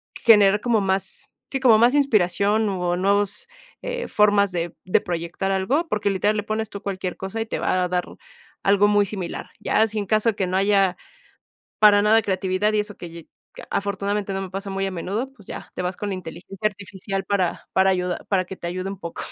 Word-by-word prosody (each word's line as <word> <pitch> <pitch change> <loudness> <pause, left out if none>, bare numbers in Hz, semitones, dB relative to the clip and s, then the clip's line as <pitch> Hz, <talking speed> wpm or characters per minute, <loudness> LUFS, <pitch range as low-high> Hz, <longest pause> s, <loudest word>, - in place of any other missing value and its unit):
generar 205 -3 +5
como 230 -4 +2
más 190 0 -1 0.2
sí, 270 - -1
como 240 -5 +6
más 245 +4 +5
inspiración 210 -4 +2
o 180 -2 -1
nuevos, 200 +2 0 0.4
eh, - - -3
formas 205 -2 +3
de 170 -1 -3
de 185 - +3
proyectar 175 +3 -3
algo, 255 - 0
porque 210 -6 0
literal 205 +2 +1
le 205 - -1
pones 215 +1 -3
tú 200 - -8
cualquier 190 -3 -4
cosa 190 +4 -5
y - - -2
te - - -3
va 185 0 +1
a - - 0
dar 180 0 0 0.6
algo 200 +1 +4
muy 205 0 +4
similar. 190 -3 -5
Ya, 220 - +2
si 215 0 -6
en 205 - -3
caso 215 +1 +2
de 210 - -1
que 190 - 0
no 185 +1 0
haya 195 -2 +3 0.8
para 205 -1 +7
nada 220 +2 +5
creatividad 190 +1 0
y 210 - +2
eso 210 -1 -9
que 175 - -8
lle 165 -1 -11 0.3
que - - -9
afortunadamente 200 0 -2
no 195 - -2
me 190 - -6
pasa 195 +1 -5
muy 195 0 -2
a 195 - -4
menudo, 205 +9 -3
pues 210 -7 -19
ya - - -8
te - - -3
vas 180 0 -2
con 205 - -4
la 195 - -2
inteligencia 185 +3 -4
artificial 195 -1 -5
para 190 -4 -1
para 190 0 +4
ayuda 180 -1 -2
para 185 -3 +2
que 190 - -8
te - - -8
ayude 185 +2 -3
un 195 -1 -7
poco. 170 -3 -6
200 Hz, 215 wpm, -23 LUFS, 185-210 Hz, 0.8 s, para